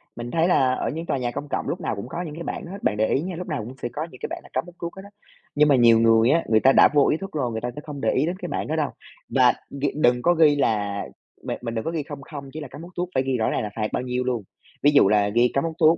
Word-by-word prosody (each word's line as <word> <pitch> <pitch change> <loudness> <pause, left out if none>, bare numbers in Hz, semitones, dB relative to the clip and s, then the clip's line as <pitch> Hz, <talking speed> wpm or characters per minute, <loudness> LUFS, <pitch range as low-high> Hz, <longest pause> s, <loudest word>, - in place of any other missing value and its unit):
Mình 120 0 -6
thấy 165 +1 +2
là 135 -8 +3
ở - - -2
những 165 +2 -5
tòa 140 - -1
nhà 125 -2 -2
công 145 +4 -6
cộng - - -2
lúc - - -3
nào - - -2
cũng 100 +4 -6
có 170 - -4
những 155 -4 -6
cái 170 - -6
bảng - - -5
đó 170 - -9
hết, 200 +1 -9
bạn 105 - +1
để 110 +1 +2
ý 135 - +1
nha, 180 +2 -4
lúc 180 +2 -6
nào 150 -5 -2
cũng 125 - -8
sẽ 120 - -2
có 155 +2 -3
những 130 - -13
cái - - -2
bảng - - -5
là - - -16
cấm 130 - -1
hút 175 -1 -14
thuốc 170 0 -5
hết 190 - -9
á. 200 - -12 0.5
Nhưng 150 +1 +5
mà 145 - +5
nhiều 115 -2 +6
người 115 +1 +5
á, 165 +4 +3
người 110 -1 +5
ta 135 +4 +5
đã - - +7
vô 145 -2 +5
ý 155 - +2
thức 195 +2 -7
rồi, 130 -6 -2
người 110 0 -4
ta 125 - -2
sẽ 150 - -6
không 145 -2 -7
để - - +2
ý 135 - +1
đến 175 +3 -2
cái - - -6
bảng - - -3
đó - - -1
đâu. - - 0 0.4
Và - - +4 0.2
gh 140 +1 -4 0.2
đừng 125 -2 +4
có 175 - +4
ghi 155 -3 +5
là 105 -7 0 0.4
bạn - - -3
bạn 115 -1 -4
đừng 110 - -3
có 165 - -1
ghi 160 -3 -2
không 145 -1 -8
không 140 -1 -9
chỉ 155 - -6
là 145 - -6
cấm 140 +4 -11
hút 175 +2 -11
thuốc, 175 0 -2
phải 130 - +2
ghi 135 -1 0
rõ 110 - +1
ràng - - -1
là 105 - -3
phạt 110 -1 -1
bao - - -1
nhiêu 125 0 -2
luôn. 125 -4 -2 0.4
Ví 145 - +6
dụ 145 -8 +6
là 105 0 +3
ghi 120 +3 +3
cấm 135 - +1
hút 165 -1 -2
thuốc, 160 +1 +5
140 Hz, 350 wpm, -24 LUFS, 120-160 Hz, 0.5 s, đã